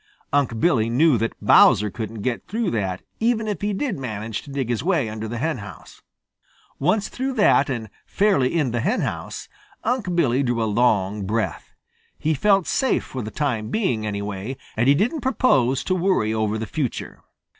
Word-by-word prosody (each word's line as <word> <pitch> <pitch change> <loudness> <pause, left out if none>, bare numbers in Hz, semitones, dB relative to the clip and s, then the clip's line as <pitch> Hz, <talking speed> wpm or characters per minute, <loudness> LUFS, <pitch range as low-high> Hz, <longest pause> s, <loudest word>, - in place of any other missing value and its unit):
Unc' 135 -6 +1
Billy 120 -9 +2
knew 145 +5 +4
that 115 +1 -2
Bowser 105 +1 +6
couldn't 110 -2 -6
get 125 -3 -2
through 220 -1 -1
that, 95 -5 -2 0.2
even 225 -1 +1
if 210 - -3
he 205 +1 0
did 205 - -2
manage 110 -3 -4
to - - -14
dig 135 -3 -2
his 120 0 -1
way 165 -8 +1
under 110 +1 -5
the 120 +2 -4
henhouse. 115 - -5 0.8
Once 185 +8 +1
through 265 +1 -3
that 205 - +4
and 115 -4 -3 0.2
fairly 170 -9 +2
in 140 -7 +1
the 120 - -1
henhouse, 205 - -2 0.4
Unc' 225 -7 -1
Billy 135 -6 +2
drew 120 -3 0
a - - +1
long 105 -3 +1
breath. 110 +1 -3 0.4
He 160 - 0
felt 195 +4 +3
safe 265 - +1
for 130 - -6
the 110 - -5
time 115 -6 -2
being, 130 - 0
anyway, 105 +3 -4 0.2
and 115 +3 +1
he 140 - +6
didn't 240 - 0
propose 135 - +2
to 185 - 0
worry 180 - +1
over 110 -1 0
the 110 - -3
future. 135 +2 -4
130 Hz, 175 wpm, -23 LUFS, 110-185 Hz, 0.8 s, Bowser